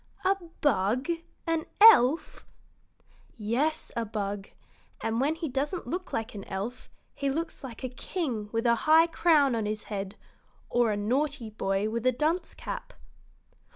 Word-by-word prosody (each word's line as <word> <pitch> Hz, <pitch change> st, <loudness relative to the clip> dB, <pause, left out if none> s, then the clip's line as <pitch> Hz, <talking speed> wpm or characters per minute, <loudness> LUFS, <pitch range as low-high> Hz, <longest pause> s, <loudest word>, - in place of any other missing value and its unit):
"A 385 Hz, +1 st, +4 dB, 0.3 s
bug 240 Hz, -, +1 dB, 0.4 s
an 330 Hz, -1 st, -1 dB
elf?" 330 Hz, -, +6 dB, 0.9 s
"Yes, 260 Hz, +9 st, -1 dB
a 235 Hz, -, 0 dB
bug; 205 Hz, -2 st, -4 dB, 0.5 s
and 225 Hz, +2 st, -1 dB
when 295 Hz, +4 st, +2 dB
he 325 Hz, 0 st, -4 dB
doesn't 285 Hz, +6 st, -2 dB
look 360 Hz, +2 st, -4 dB
like 225 Hz, +1 st, -3 dB
an 200 Hz, -2 st, -7 dB
elf, 205 Hz, +6 st, -5 dB, 0.2 s
he 280 Hz, -, -1 dB
looks 325 Hz, +3 st, -3 dB
like 250 Hz, -1 st, -8 dB
a 255 Hz, -, -2 dB
king 250 Hz, -, -4 dB
with 230 Hz, 0 st, -1 dB
a 235 Hz, -, +5 dB, 0.2 s
high 320 Hz, +1 st, +8 dB
crown 315 Hz, -5 st, +3 dB
on 225 Hz, -2 st, -1 dB
his 215 Hz, 0 st, -3 dB
head 195 Hz, 0 st, -4 dB, 0.6 s
or 240 Hz, -1 st, +3 dB
a 205 Hz, -, -1 dB
naughty 250 Hz, +2 st, -1 dB
boy 195 Hz, -1 st, 0 dB
with 230 Hz, +3 st, -1 dB
a -, -, +6 dB
dunce 310 Hz, +8 st, -1 dB
cap." -, -, -6 dB
250 Hz, 155 wpm, -28 LUFS, 215-315 Hz, 0.9 s, high